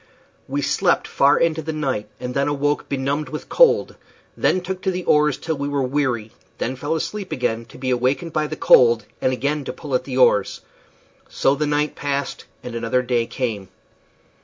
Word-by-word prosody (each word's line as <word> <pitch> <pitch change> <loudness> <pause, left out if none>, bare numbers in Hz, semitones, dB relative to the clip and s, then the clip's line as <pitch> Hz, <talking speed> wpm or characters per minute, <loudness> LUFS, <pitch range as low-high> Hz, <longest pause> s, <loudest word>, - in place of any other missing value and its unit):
We 140 +1 -2
slept 175 +6 +1
far 140 - +4
into 165 -1 +1
the 160 +1 -4
night, 130 -9 -2
then 125 +3 -2
awoke 145 0 -1
benumbed 140 +2 -1
with 155 - -7
cold; - - +4 0.4
then 185 - +2
took 185 +1 -5
to 190 - 0
the 180 -1 -2
oars 150 -3 +3
till 160 -3 -3
we 140 - -2
were 140 -1 0
weary; 125 -5 -1 0.3
then 130 - -2
fell 145 +5 -2
asleep 195 +4 -4
again, 115 -2 -1
to 115 - -15
be 130 - -3
again 125 - +1
awakened 145 +6 0
by 155 -1 0
the 155 - -5
cold 115 -6 +5 0.2
and 130 - +2
again 145 +3 -1
to - - -4
pull 145 -4 -8
at 125 - +1
the 130 -2 -4
oars. 105 -6 +3 0.7
So 135 - +2
the 150 +1 -1
night 150 +1 0
passed, 140 -1 -3 0.2
and 125 - -7
another 115 +2 0
day 120 -2 0
came. 110 -7 -3
140 Hz, 190 wpm, -21 LUFS, 125-150 Hz, 0.7 s, cold